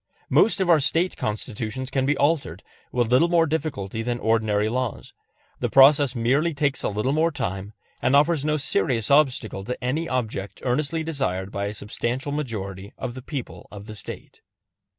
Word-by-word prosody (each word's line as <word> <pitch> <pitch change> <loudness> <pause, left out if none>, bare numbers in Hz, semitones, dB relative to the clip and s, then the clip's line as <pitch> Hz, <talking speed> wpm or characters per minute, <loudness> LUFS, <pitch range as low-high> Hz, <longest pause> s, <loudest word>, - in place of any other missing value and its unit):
Most 220 - +4
of 190 - +1
our 170 -3 +6
State 165 +5 +1
Constitutions 110 +4 -4
can 135 -1 0
be 150 - +2
altered 140 - 0 0.3
with 120 -2 0
little 130 +7 +5
more 170 -1 +3
difficulty 140 -10 -3
than 120 +1 -2
ordinary 110 -2 +1
laws; 125 0 -3 0.5
the - - -1
process 140 -1 +6
merely 140 +8 +1
takes 140 -1 0
a - - 0
little 105 +6 -1
more 160 +2 +3
time, 100 - -4 0.3
and 130 - +3
offers 150 0 +3
no 150 0 +1
serious 115 -3 0
obstacle 130 -9 +2
to 125 +5 -4
any 155 +7 -1
object 110 -6 -3
earnestly 150 +5 0
desired 100 - -2
by 100 0 -2
a 100 - -3
substantial 120 +6 -3
majority 100 -9 -5
of 120 - -4
the 130 - -8
people 135 -1 -7
of 100 0 -10
the 110 - -8
State. 105 - -9
130 Hz, 170 wpm, -24 LUFS, 110-150 Hz, 0.5 s, our